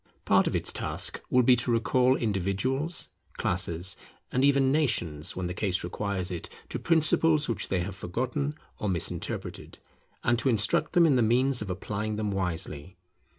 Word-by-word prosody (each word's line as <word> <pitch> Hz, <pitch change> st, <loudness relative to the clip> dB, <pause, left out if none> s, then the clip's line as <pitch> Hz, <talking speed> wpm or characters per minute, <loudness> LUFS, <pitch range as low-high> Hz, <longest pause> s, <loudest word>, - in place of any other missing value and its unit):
Part -, -, +4 dB
of -, -, -1 dB
its -, -, +1 dB
task -, -, -2 dB
will 125 Hz, 0 st, +4 dB
be 125 Hz, +1 st, +6 dB
to 120 Hz, -, -1 dB
recall 125 Hz, +3 st, +3 dB
individuals, 115 Hz, -, -1 dB, 0.3 s
classes, 85 Hz, +3 st, -1 dB, 0.4 s
and 130 Hz, -, +1 dB
even 140 Hz, -1 st, +4 dB
nations, 90 Hz, -, -1 dB
when 90 Hz, -, -3 dB
the 90 Hz, -, -3 dB
case 95 Hz, -1 st, -1 dB
requires 95 Hz, +1 st, -2 dB
it, 85 Hz, -2 st, -5 dB, 0.2 s
to -, -, -4 dB
principles 160 Hz, -2 st, +4 dB
which 110 Hz, -4 st, -2 dB
they 95 Hz, -2 st, 0 dB
have 95 Hz, +2 st, -5 dB
forgotten 130 Hz, -, -3 dB, 0.2 s
or 105 Hz, -, -1 dB
misinterpreted, 85 Hz, -4 st, -4 dB, 0.5 s
and 120 Hz, -1 st, +2 dB
to 130 Hz, -, +1 dB
instruct 110 Hz, +3 st, +3 dB
them 175 Hz, -2 st, +6 dB
in 145 Hz, -5 st, +4 dB
the -, -, +3 dB
means 125 Hz, +3 st, +2 dB
of 105 Hz, -, -5 dB
applying 105 Hz, +3 st, -3 dB
them 105 Hz, -1 st, -2 dB
wisely. 90 Hz, -3 st, -3 dB
110 Hz, 165 wpm, -28 LUFS, 95-130 Hz, 0.5 s, be